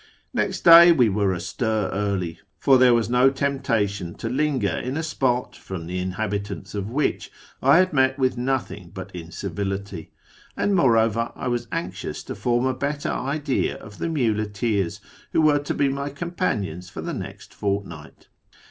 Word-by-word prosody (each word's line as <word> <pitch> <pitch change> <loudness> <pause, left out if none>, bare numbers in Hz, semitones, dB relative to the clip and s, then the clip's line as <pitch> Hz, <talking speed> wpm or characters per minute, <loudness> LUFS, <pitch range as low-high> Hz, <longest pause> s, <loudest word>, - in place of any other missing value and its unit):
Next - - -1
day 170 0 +10
we 125 -9 +4
were 100 -1 +1
astir 100 +3 -1
early, 95 -4 -2 0.2
for 135 -2 +4
there 125 -1 +6
was 115 -1 +1
no 125 +2 +4
temptation 110 -10 -1
to 115 - -4
linger 130 -5 0
in 130 +3 -3
a 160 - -2
spot 130 -5 -1
from 90 -4 -7
the 90 +2 -3
inhabitants 100 +1 -4
of 100 0 -3
which 140 +5 -1 0.3
I 135 +4 +6
had 185 -1 +3
met 130 -1 +3
with 130 -2 +1
nothing 120 -8 -2
but 95 - -7
incivility; 95 +1 -5 0.5
and, 205 - +1
moreover, 115 - +3
I - - -3
was 120 -1 -2
anxious 90 +3 -4
to - - -6
form 120 +1 0
a 130 - +1
better 145 +2 -2
idea 140 +1 -1
of 105 -1 -13
the 170 - -1
muleteers 110 - -1 0.3
who - - +4
were 150 -1 +4
to 145 - -3
be 140 - +2
my 140 +1 -2
com 170 +5 -6
panions 95 - -2
for 95 - -7
the - - -4
next - - -8
fortnight. 100 -7 -4
115 Hz, 165 wpm, -24 LUFS, 100-135 Hz, 0.5 s, day